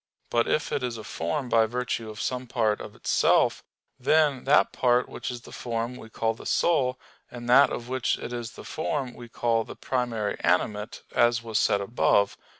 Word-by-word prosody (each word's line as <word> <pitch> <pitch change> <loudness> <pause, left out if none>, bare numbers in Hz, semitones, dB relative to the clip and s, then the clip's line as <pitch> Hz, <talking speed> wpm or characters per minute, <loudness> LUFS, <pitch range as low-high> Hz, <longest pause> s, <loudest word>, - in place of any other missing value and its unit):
But 120 0 +2
if 150 - 0
it - - 0
is 125 -2 -3
a 110 - -8
form 85 - -3
by 115 -1 +4
virtue 115 -1 -3
of 105 0 -9
some 125 0 -2
part 110 -3 0
of - - -9
itself, - - +2 0.4
then 145 0 +2
that 145 +2 +4
part 125 -1 +2
which - - -6
is 120 -1 -6
the - - -13
form 115 0 -3
we 110 - -11
call 115 0 -1
the - - -10
soul, 130 -7 +2 0.3
and 120 -1 -8
that 135 +4 +7
of 120 - -5
which 130 -1 0
it 125 - -6
is 120 -2 -5
the - - -11
form 140 -5 -3
we 120 -1 -11
call 115 -1 +1
the - - -10
"primary 120 -5 -2
animate," 105 +5 0
as 120 0 +3
was 110 -2 0
said 100 - +2
above 100 -1 +2
(Q. - - -36
120 Hz, 200 wpm, -26 LUFS, 115-125 Hz, 0.4 s, that